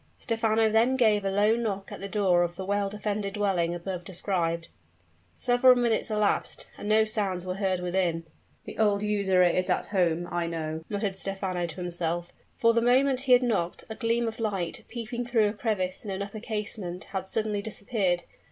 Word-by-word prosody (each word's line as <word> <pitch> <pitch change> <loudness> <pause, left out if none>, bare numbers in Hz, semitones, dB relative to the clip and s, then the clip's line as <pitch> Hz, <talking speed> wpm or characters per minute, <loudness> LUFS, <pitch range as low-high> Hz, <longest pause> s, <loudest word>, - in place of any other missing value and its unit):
Stephano 225 -1 +1
then 225 +4 +3
gave 215 -5 +3
a 195 - 0
low 205 +3 +3
knock 205 -4 -3
at - - -7
the 200 - -6
door 190 -4 +3
of 175 0 -1
the 190 - -5
well 200 0 0
defended 210 -1 -3
dwelling 180 -5 +1
above 175 0 -5
described. 170 -2 -2 0.7
Several 250 +1 +5
minutes 235 -3 +1
elapsed; 210 -2 0
and 205 - -6
no 220 +1 +5
sounds 200 -4 -1
were 185 - -2
heard 190 -2 -1
within. 175 -2 0 0.4
"The - - -9
old 205 -2 +3
usurer 200 -3 +3
is 180 +1 +2
at - - +1
home, 175 -3 +1
I 175 -1 -1
know," 160 -1 -4
muttered 205 -2 -2
Stephano 190 -3 -2
to 160 - -7
himself; 175 0 -3 0.2
for 230 0 +4
the 230 - +2
moment 255 +2 +3
he 265 -2 +4
had 250 +1 +6
knocked 200 -8 -1
a - - -4
gleam 230 +1 0
of 225 - -5
light, 195 -6 -2
peeping 235 +1 -4
through 225 -4 +3
a - - -4
crevice 205 -4 -2
in 210 - -6
an 195 +1 -2
upper 205 +2 -7
casement, 210 -5 -4
had 190 -1 -3
suddenly 215 0 -1
disappeared. 200 -4 -1
200 Hz, 190 wpm, -27 LUFS, 180-220 Hz, 0.7 s, had